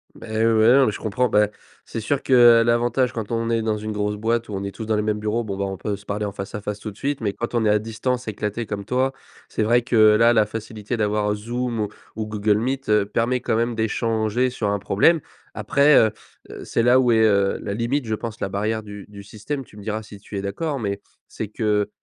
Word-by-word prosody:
Beh, - - -11 0.2
ouais 110 -1 +4
non, 135 -1 +6
mais - - +1
je - - -7
comprends, 120 +3 0
bah, 105 -2 +3 0.4
c'est - - -5
sûr 135 +5 -1
que, 130 - 0 0.3
heu, - - +3
l'avantage 120 +2 +1
quand 110 -2 -5
on 115 0 -1
est 115 -1 +1
dans 110 -1 0
une 110 +1 -4
grosse 105 0 -1
boîte 115 +2 -1
où 105 - -7
on 95 0 -3
est 100 - -3
tous 110 - -7
dans 110 - 0
les 105 - +1
mêmes 105 0 -1
bureaux 110 +2 -1
bon, 100 -3 -5
bah, 100 - -1
on 95 0 -4
peut 100 +2 -3
se 100 - -18
parler 105 +1 -3
en 100 - -2
face-à-face 105 +1 -5
tout 110 - -6
de 100 - -18
suite, 140 0 -2
mais 105 -3 -2
quand 120 +3 -4
on 115 -2 +2
est - - +3
à 105 0 +4
distance 120 +3 -3
éclaté 105 +1 -3
comme 100 -1 -5
toi, 130 +1 +1 0.4
c'est - - -1
vrai 120 +3 +3
que 120 0 -2
là, 110 +1 +6
la 110 -2 +4
facilité 110 +1 -5
d'avoir 105 -1 0
Zoom 115 0 -2 0.3
ou 110 0 -4
Google 105 0 +1
Meet, 135 +2 -3
heu, 105 -1 +4
permet 115 +4 0
quand - - 0
même 115 +1 0
d'échanger 110 +2 0
sur 115 -4 -2
un 100 - +1
problème. 105 - +3 0.4
Après, 140 +7 +4
heu 110 -1 +5 0.4
heu, - - -8
c'est 115 - 0
là 125 +2 +5
où 125 -2 +3
est, 115 - +4
heu, 100 -2 +2
la 100 - -3
limite 120 +5 -1
je 110 - -2
pense 115 0 -5
la 95 - -2
barrière 110 +3 -2
du 105 -1 -9
du 100 -1 -11
système, 125 +7 -6
tu 105 - -17
me - - -9
diras 110 +1 -3
si 105 -1 -12
tu 100 0 -8
es - - -2
d'accord, 140 +9 -3
mais 100 -3 -3 0.3
c'est 110 - -5
que, 105 -1 0
110 Hz, 255 wpm, -22 LUFS, 105-120 Hz, 0.4 s, non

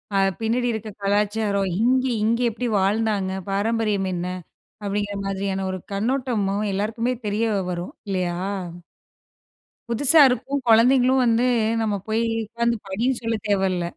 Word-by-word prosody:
அ - - +3 0.2
பின்னாடி 235 +2 0
இருக்கிற 220 -1 -5
கலாச்சாரம், 205 0 +1
இங்க 255 +2 +3 0.2
இங்க 230 +2 +2
எப்படி 245 +3 -3
வாழ்ந்தாங்க? 200 -1 0 0.2
பாரம்பரியம் 205 -1 0
என்ன? 175 0 -3 0.6
அப்படிங்கிற 205 0 -2
மாதிரியான 195 0 -2
ஒரு 185 - -4
கண்ணோட்டமும் 215 -2 -1
எல்லாருக்குமே 225 +5 -1
தெரிய 220 +2 0 0.2
வரும். 175 0 -5 0.2
இல்லையா? 180 -2 -1 1.5
புதுசா 280 +7 +5
இருக்கும், 270 +3 -1
குழந்தைகளும் 250 +3 +5
வந்து 235 +1 +3 0.4
நம்ம 210 -2 0
போய் 220 +1 0 0.2
உட்கார்ந்து 235 +1 -1
படின்னு 235 +7 0
சொல்ல 230 -1 -1
தேவல்ல. 190 -3 +1
215 Hz, 120 wpm, -23 LUFS, 195-235 Hz, 1.5 s, புதுசா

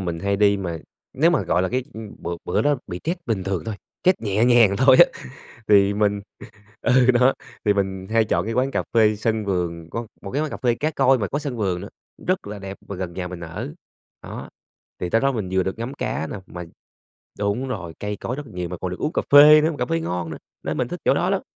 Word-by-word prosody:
mình 85 -2 -3
hay 100 0 0
đi 100 0 +4
mà 85 -4 -4 0.3
nếu 160 +6 +3
mà, 170 - +2
gọi 90 - +1
là, 95 - 0
cái 130 +4 -1
ưm, 110 -2 -8
bữa 85 0 -4
bữa - - 0
đó 145 0 +2
bị 90 -2 -6
stress 170 +3 -1
bình 105 -6 -1
thường 95 -2 -2
thôi, 110 - -4 0.3
stress 185 +1 +4
nhẹ 105 +1 +2
nhàng 120 -5 +5
thôi 130 0 +6
á, - - +11 0.6
thì 100 -1 +5
mình 105 -1 +1 0.6
ừ, 130 0 +4
đó, 125 +2 +4 0.3
thì 105 - +4
mình 95 -1 -2
hay 115 0 +3
chọn 85 -2 0
cái 115 - -2
quán 130 +3 +1
cà - - -1
phê 110 -2 +4
sân 110 0 -1
vườn, 85 -4 -2
có 115 +4 -5
một 100 - -7
cái 145 - 0
quán 155 - -1
cà - - -5
phê 120 -3 +1
cá 155 +6 -1
Koi 135 -3 +3
mà 100 - -2
có 140 - -2
sân 140 -5 -5
vườn 95 -5 -1
nữa, 100 - -8 0.4
rất 185 - 0
là 105 0 -6
đẹp 95 0 -7
mà 100 - -5
gần 90 -2 -5
nhà 90 0 -4
mình 90 -1 -8
ở. 80 -3 -6 0.5
Đó, - - -8 0.5
thì 90 - -3
tới 115 - +2
đó 135 0 +3
mình 110 -7 -3
vừa 95 0 +2
được 95 +3 -3
ngắm 120 +4 -4
cá 80 - -3
nè, - - -6
mà 90 0 -7 0.8
đúng 105 +6 -1
rồi, 95 -10 -5
cây 105 0 -3
cối 120 +5 -4
rất 145 +1 -7
là - - -14
nhiều 90 -1 -4
mà 90 - -5
còn 90 - -4
được 90 - -6
uống 155 - -2
cà - - +1
phê 150 +2 +9
nữa 160 +2 +2
mà 150 - -7
cà 125 - 0
phê 165 +6 0
ngon 90 - -3
nữa, 80 - -6 0.3
nên - - -3
mình - - 0
thích - - -6
chỗ - - +5
đó - - 0
lắm. - - +1
105 Hz, 260 wpm, -23 LUFS, 95-130 Hz, 0.8 s, á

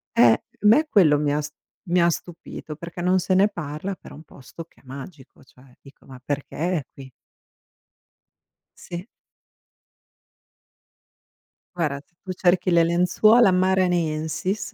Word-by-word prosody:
Eh, 120 -1 +5 0.2
me 230 +10 +5
quello 160 - +5
mi 145 0 0
ha 150 - 0
s 150 - -6 0.3
mi 180 -2 +1
ha 170 - +4
stupito, 165 -2 -7
perché 170 +2 -8
non 185 +1 +2
se 185 - -1
ne 195 +2 +5
parla 175 +1 -5
però - - -14
un 155 - -13
posto 150 +3 -12
che - - -27
è - - -36
magico, 135 +2 -11
cioè, 130 0 -22
dico 135 -1 -19
ma 130 -1 -13
perché 145 +1 -5 0.2
è 145 - -5
qui? 135 -1 -12 1.7
Sì. 175 +2 -8 2.7
Guarda, 150 -5 -2
se 175 - -42
tu 185 - -6
cerchi 180 0 +1
le 170 -1 +5
lenzuola 180 +7 +4
Maranhenses 180 0 0
170 Hz, 140 wpm, -23 LUFS, 145-185 Hz, 2.7 s, Eh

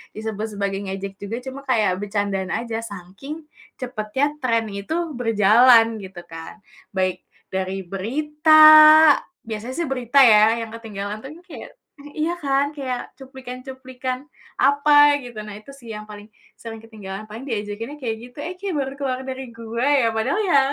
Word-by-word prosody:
disebut 220 0 -4
sebagai 195 -1 -1
ngejek 195 0 -6
juga, 210 +4 -5
cuma 265 +1 -7
kayak 215 -7 +2
bercandaan 200 -2 -2
aja, 225 0 -3
saking 230 - -9 0.3
cepatnya 250 +1 -2 0.2
tren 230 -2 +1
itu 200 +10 -5 0.2
berjalan, 225 0 +4
gitu, 185 -2 -10
kan. 165 +5 -10 0.3
Baik 185 -1 -2 0.3
dari 190 0 -2
berita, 300 - +2 0.9
biasanya, 225 +3 -5
sih 340 -3 -1
berita 255 0 +1
ya 225 0 +5
yang - - -13
ketinggalan 210 -1 -7
tuh, 270 - -8 0.2
kayak - - -10 0.3
mmm, 290 +1 -12
iya 320 +3 0
kan, 280 -1 0
kayak 260 -4 -5
cuplikan-cuplikan 260 0 -7 0.3
apa, 290 +1 +5
gitu. 240 -3 -11
Nah 210 -1 -9
itu 275 +6 -14
sih 240 -4 -14
yang 210 0 -8
paling 205 0 -11 0.3
sering 225 -1 -8
ketinggalan. 210 -2 -9
Paling 225 +5 -8
diejekinnya 220 +5 -5
kayak 225 -3 -3
gitu, - - -31
"Eh, 350 - -5
kayak 390 -3 -4
baru 270 0 -3
keluar 260 -2 -2
dari 265 0 -5
gua, 230 +2 -4 0.2
ya?" 230 - +2
padahal, 220 - 0
ya, 350 -9 +4
230 Hz, 155 wpm, -22 LUFS, 210-270 Hz, 0.9 s, ya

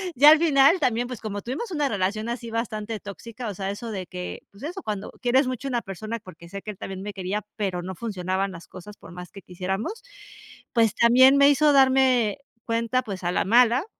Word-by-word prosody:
ya 290 +4 +8
al 315 - +8
final 310 +1 +5
también. 245 -2 +1
Pues, 250 -3 -7
como 205 -2 -5
tuvimos 285 - -5
una 295 -4 0
relación, 205 +1 -1
así 235 -1 -5
bastante 220 -1 -3
tóxica. 225 +4 -8
O - - -4
sea, 195 +1 -3
eso 225 +3 -6
de 190 -4 -5
que, 180 0 -7
pues 200 - -16
eso, 355 +6 -5
cuando 205 -2 -4
quieres 260 +2 +3
mucho 255 +1 -4
una 240 -2 -1
persona, 215 +4 -6
porque, 170 -4 -14
sé 195 +2 -7
que 215 - -6
él 205 - -13
también 190 0 -7
me 205 +1 -6
quería, 195 +2 -3
pero, 190 -4 -2
no 185 +1 -6
funcionaban 190 -2 -2
las 170 -2 -11
cosas, 205 +3 -11
por - - -14
más 180 0 -9
que 195 - -11
quisiéramos. 190 - -4 0.7
Pues, 225 -4 +3
también 255 +4 +6
me 280 0 +7
hizo 295 +1 +4
darme 260 -4 +4 0.3
cuenta, 230 +2 0
pues, 195 -3 -7
a 175 - 0
la - - +1
mala. 240 - +4
220 Hz, 215 wpm, -25 LUFS, 195-255 Hz, 0.7 s, ya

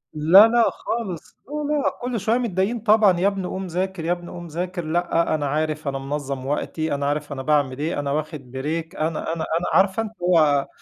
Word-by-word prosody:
لا، 180 +8 +8
لأ، 235 0 +3
خالص، 195 -9 -5
لا، 295 - -10 0.2
لأ، 290 - +2
كلّ 245 -2 -2
شويّة 225 +5 +1
متضايقين 225 0 -1
طبعًا، 210 -4 +4
يابني 195 -1 0
قوم 190 0 -4
ذاكر، 180 -1 -3
يابني 175 0 -2
قوم 175 -1 -8
ذاكر، 175 +1 -4
لأ، 170 0 +1
أنا 145 -2 -2
عارف، 155 +1 -2
أنا 135 -1 -1
منظّم 135 -1 -4
وقتي، 155 +2 -2
أنا 140 0 -2
عارف 145 0 -2
أنا 135 -1 -4
باعمل 145 -2 +1
إيه، 155 0 -2
أنا 140 -1 -2
واخد 155 +1 -3 0.2
break، 160 +4 -4
أنا 155 0 -1
أنا 160 -1 -3
أنا 175 - -4
عارفة 190 +3 +3
اللي 220 0 -7
هو، 155 -6 +3
165 Hz, 195 wpm, -23 LUFS, 150-190 Hz, 0.2 s, لا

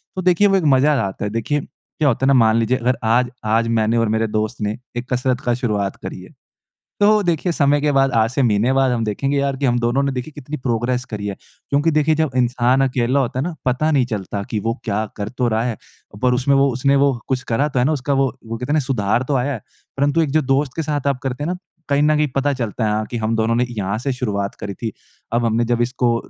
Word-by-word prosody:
तो 185 - -2
देखिए 185 +3 +4
वो 195 - +3
एक 185 - -1
मज़ा 150 +3 +3
आता 95 +1 -5
है। 105 - -3
देखिए 115 +6 -1
क्या 145 +3 -5
होता 135 0 +1
है - - +3
ना 140 - +5
मान 110 -1 +4
लीजिए 115 +3 +1
अगर 125 0 0
आज 120 +3 +2 0.2
आज 115 +2 +2
मैंने 115 0 +1
और 115 -1 +2
मेरे 110 +1 +1
दोस्त 110 +2 -2
ने 105 +1 -1 0.2
एक 120 +1 -5
कसरत 125 0 0
का 120 - 0
शुरुआत 105 -5 -1
करी - - -8
है। - - -13 0.7
तो 210 +1 +5
देखिए 175 -1 0
समय 145 -2 +2
के 150 0 +1
बाद 135 -1 +3
आज 115 0 +3
से 130 +2 0
महीने 115 +1 +2
बाद 135 -1 +3
हम 115 -2 0
देखेंगे 135 +7 -1
यार 140 -1 0
कि 140 - -1
हम 120 -1 +2
दोनों 120 +4 +1
ने 140 -1 0
देखिए 125 +4 -5
कितनी 145 +1 -6
प्रोग्रेस 125 0 -1
करी 105 -4 -6
है। 100 - -3 0.4
क्योंकि 145 +3 +2
देखिए 155 0 +2
जब 155 -1 0
इंसान 125 +1 +2
अकेला 125 +2 +1
होता 125 -1 -2
है - - 0
ना 175 0 -3
पता 130 +5 +1
नहीं 140 -5 +3
चलता 100 -3 -4
कि 110 - -1
वो 115 +2 -1
क्या 105 0 -1
कर 100 -1 -3
तो 125 +1 -1
रहा 110 0 +1
है, 120 -3 -2 0.5
पर 125 -1 +3
उसमें 135 +3 +2
वो 135 0 +4
उसने 140 +3 +2
वो 140 0 +4 0.2
कुछ 130 -1 0
करा 135 +6 +1
तो 135 - -2
है 125 - +3
ना 150 - +2
उसका 140 -1 -1
वो 135 0 +3 0.2
वो 115 +1 -4
कहते 125 +4 -5
है - - +3
ना 155 - +3
सुधार 120 -4 0
तो 145 - +1
आया 130 +3 0
है। 120 - -5 0.4
परंतु 145 +3 +2
एक 155 - -1
जो 155 +1 +3
दोस्त 135 0 +1
के 165 - -1
साथ 145 -2 -2
आप 140 -2 +1
करते 135 +2 -3
हैं 165 - -2
ना, 180 - -2 0.3
कहीं 140 0 +2
न 150 0 +3
कहीं 150 0 +2
पता 140 +1 +1
चलता 115 -3 -2
है 110 - -2
कि 120 - -3
हम 110 0 -1
दोनों 110 +1 +1
ने 125 - +2
यहाँ 105 -2 -2
से 135 +3 -2
शुरुआत 100 -6 -2
करी 100 -1 -5
थी। 110 0 -5 0.4
अब 120 +1 +1
हमने 115 +1 +2
जब 120 0 +1
इसको 120 -1 +1
125 Hz, 265 wpm, -20 LUFS, 115-140 Hz, 0.7 s, ना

